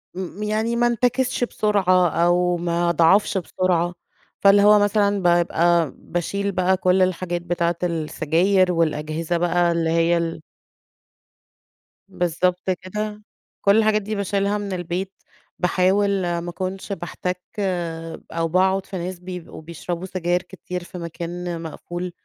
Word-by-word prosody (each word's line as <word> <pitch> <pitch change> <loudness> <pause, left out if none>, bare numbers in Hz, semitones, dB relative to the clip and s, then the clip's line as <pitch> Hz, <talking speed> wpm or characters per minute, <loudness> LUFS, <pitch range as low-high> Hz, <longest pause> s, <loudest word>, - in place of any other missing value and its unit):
م 190 +2 -5
يعني 220 +2 0
ما 240 0 +3
انتكسش 245 +2 +1
بسرعة 185 -6 +2
أو 175 +1 +2
ما 170 0 0
اضعفش 170 +5 +4
بسرعة، 175 -1 0 0.5
فاللي 200 0 +6
هو 210 0 +7
مثلًا 205 0 +2
بابقى 170 -2 +3
باشيل 200 +4 -2
بقى 185 0 +2
كل 185 +1 +2
الحاجات 180 -1 0
بتاعة 170 -1 -1
السجاير، 170 +3 +1
والأجهزة 160 0 -1
بقى 175 0 +2
اللي 165 -1 0
هي 165 +1 +3
ال 165 -1 -3 1.7
بالضبط 180 0 -1
كده، 210 +3 -4 0.4
كل 200 +2 +4
الحاجات 215 -1 +3
دي 210 +1 -4
باشيلها 200 +1 0
من 200 -2 -4
البيت 180 +2 -3 0.5
باحاول 190 +3 +2 0.3
ما 175 +1 -5
اكونش 190 +3 -5
باحتّك 180 0 -4 0.9
أو 165 0 -1
باقعد 190 +3 +2
في 190 - -6
ناس 180 +1 -5
بيبقوا 180 -3 -8
بيشربوا 170 +2 -5
سجاير 180 -1 -1
كتير 180 0 -7
في 180 - -10
مكان 170 0 -5
مقفول، 175 +2 -6
180 Hz, 125 wpm, -22 LUFS, 170-195 Hz, 1.7 s, هو